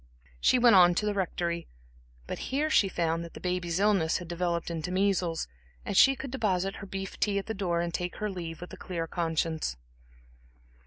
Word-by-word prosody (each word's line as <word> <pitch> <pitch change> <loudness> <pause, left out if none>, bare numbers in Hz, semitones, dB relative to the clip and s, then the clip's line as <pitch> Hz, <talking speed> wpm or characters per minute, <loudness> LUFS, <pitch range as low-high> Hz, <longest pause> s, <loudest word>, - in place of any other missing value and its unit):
She 255 - +4
went 240 -3 +6
on 175 -1 +7
to 210 - 0
the 210 - +1
Rectory, 170 -3 -2 0.6
but - - -5
here 295 +4 0
she 200 -9 +4
found 165 -2 -1
that 170 - -10
the - - -7
baby's 180 -1 -1
illness 195 -6 +3
had 175 - -8
developed 170 0 -2
into 165 +1 -3
measles, 185 -3 +1 0.4
and - - -3
she 270 +7 +7
could 270 0 -7
deposit 195 -6 0
her 200 - -8
beef 195 0 -6
tea 205 -2 +1
at 200 - -2
the 220 - -3
door 175 -4 0
and 170 0 -3
take 180 0 -3
her 215 - -2
leave 170 -3 -6
with 180 - -9
a - - -8
clear 170 -3 -4
conscience. 165 - -1
180 Hz, 200 wpm, -29 LUFS, 170-200 Hz, 0.6 s, on